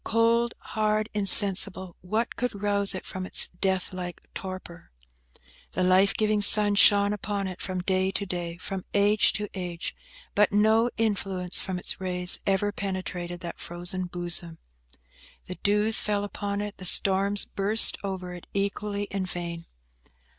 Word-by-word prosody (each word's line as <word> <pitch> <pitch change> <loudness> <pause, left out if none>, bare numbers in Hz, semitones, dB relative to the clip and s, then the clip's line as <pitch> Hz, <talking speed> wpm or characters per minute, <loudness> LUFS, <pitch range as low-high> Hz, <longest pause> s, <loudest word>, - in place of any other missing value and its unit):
Cold, 230 +1 +1
hard, 215 0 -2
insensible, 195 -3 +5
what 215 +6 -2
could 245 -5 -4
rouse 200 -1 +1
it 185 - -7
from 185 - -6
its 185 - -1
death 190 -1 -1
like 180 -2 -6
torpor? 185 -3 -8 0.8
The 185 - -1
life 185 +2 +3
giving 215 -1 0
sun 205 0 +5
shone 205 0 +4
upon 200 -1 -4
it 185 - -8
from 185 -1 -3
day 185 +1 0
to 200 - -3
day, 175 -2 -5
from 190 +1 -6
age 205 +1 +3
to 210 0 -3
age; 175 -3 -6 0.4
but 210 0 +3
no 220 +3 +3
influence 195 -5 -1
from 190 -1 -4
its 180 - -3
rays 180 -1 +3
ever 195 +1 +1
penetrated 185 -3 -5
that 170 -1 -7
frozen 175 +2 -5
bosom. 175 -1 -3 0.9
The 180 - -8
dews 210 +2 +4
fell 205 -1 -1
upon 205 0 -4
it, 205 -1 -6
the 185 - -8
storms 195 +2 +2
burst 205 +3 +5
over 185 -2 -5
it, 175 - -11
equally 200 +1 -2
in 195 -1 -3
vain. 170 -2 -6
195 Hz, 150 wpm, -26 LUFS, 180-205 Hz, 0.9 s, insensible